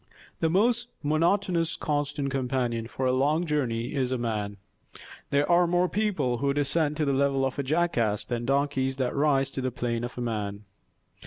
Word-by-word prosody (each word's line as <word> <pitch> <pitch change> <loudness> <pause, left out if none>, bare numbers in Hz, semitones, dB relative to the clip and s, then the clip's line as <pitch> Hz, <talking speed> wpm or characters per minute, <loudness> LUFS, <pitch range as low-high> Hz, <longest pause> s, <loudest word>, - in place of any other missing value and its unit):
The 160 - +2
most 230 +7 +2 0.2
monotonous 170 +3 +1
constant 145 -1 -2
companion 125 -3 -1
for 130 +2 -3
a 130 - +3
long 150 +6 +2
journey 125 -7 -1
is 130 -3 0
a 130 - 0
man. 105 -4 -3 0.7
There 140 +1 +2
are 175 0 +4
more 175 +1 +2
people 180 - 0
who 140 0 0
descend 145 +1 +1
to 155 - +1
the 140 - +1
level 135 0 +2
of 135 +1 -3
a - - +3
jackass 135 -8 +1
than 120 -1 -3
donkeys 135 -1 +1
that 130 -2 -1
rise 140 -2 +2
to 135 - -4
the 130 - 0
plane 120 -1 -2
of 120 - -6
man. 105 -4 -3
140 Hz, 175 wpm, -27 LUFS, 125-155 Hz, 0.7 s, are